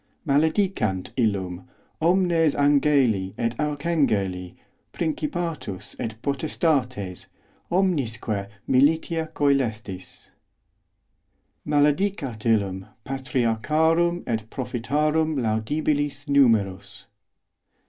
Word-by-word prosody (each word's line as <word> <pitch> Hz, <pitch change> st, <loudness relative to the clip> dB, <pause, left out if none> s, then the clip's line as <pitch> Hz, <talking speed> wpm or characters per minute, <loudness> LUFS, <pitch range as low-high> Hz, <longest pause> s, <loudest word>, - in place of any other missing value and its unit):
Maledicant 150 Hz, -, +1 dB
illum 100 Hz, -4 st, -1 dB, 0.3 s
omnes 170 Hz, -3 st, +3 dB
angeli 140 Hz, -9 st, +2 dB
et 115 Hz, 0 st, 0 dB
archangeli, 140 Hz, -, 0 dB, 0.4 s
principatus 155 Hz, -, -3 dB
et 110 Hz, -1 st, -4 dB
potestates, 135 Hz, -, -1 dB, 0.4 s
omnisque 120 Hz, -, 0 dB, 0.2 s
militia 160 Hz, +4 st, +2 dB
cœlestis. 120 Hz, -10 st, 0 dB
os -, -, -11 dB, 1.4 s
Maledicat 145 Hz, -, +1 dB
illum 100 Hz, -4 st, +1 dB, 0.2 s
patriarcharum 145 Hz, +7 st, +1 dB
et 110 Hz, -2 st, -3 dB
prophetarum 150 Hz, +6 st, 0 dB
laudabilis 140 Hz, +6 st, -1 dB
numerus. 100 Hz, -8 st, +2 dB
140 Hz, 65 wpm, -24 LUFS, 110-155 Hz, 1.4 s, omnes